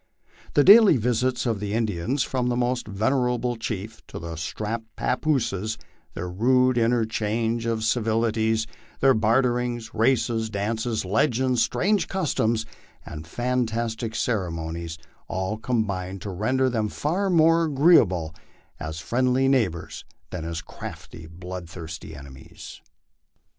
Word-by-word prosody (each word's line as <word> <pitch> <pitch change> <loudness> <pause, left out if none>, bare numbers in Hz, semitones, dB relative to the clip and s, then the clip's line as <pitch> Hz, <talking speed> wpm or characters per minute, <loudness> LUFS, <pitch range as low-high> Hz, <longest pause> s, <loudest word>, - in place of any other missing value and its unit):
The 145 - +6
daily 205 - +8
visits 125 +2 0
of 115 -4 0
the 105 0 -3
Indians, 115 +4 0
from 125 -2 -1
the 120 - 0
most 125 -1 -1
venerable 125 +3 0
chief 110 -1 -5
to - - -8
the 85 0 -6
strapped 105 +8 -4
pappoose, 110 -8 -1 0.4
their 90 - -4
rude 125 +7 +3
interchange 115 -1 0
of 115 -1 -1
civilities, 110 -1 +1 0.3
their 135 0 +5
barterings, 120 0 +1
races, 115 -1 +1
dances, 110 +2 -2
legends, 125 +4 +1
strange 205 - +1
customs, 115 - 0 0.4
and 75 +1 -8
fantastic 115 0 -2
ceremonies, 85 -7 -2 0.3
all 95 +3 -2
combine 100 -6 -2
to 100 +1 -6
render 125 +8 +1
them 110 -4 0
far 180 - -1
more 165 -1 +4
agreeable 135 - +4 0.5
as 80 +1 -5
friendly 130 +6 +1
neighbors 110 -12 0 0.3
than 90 -3 -5
as 80 -1 -4
crafty, 80 0 -9
blood 90 +1 -8
thirsty 80 -2 -8
enemies. 70 -1 -11
115 Hz, 120 wpm, -25 LUFS, 95-125 Hz, 0.5 s, daily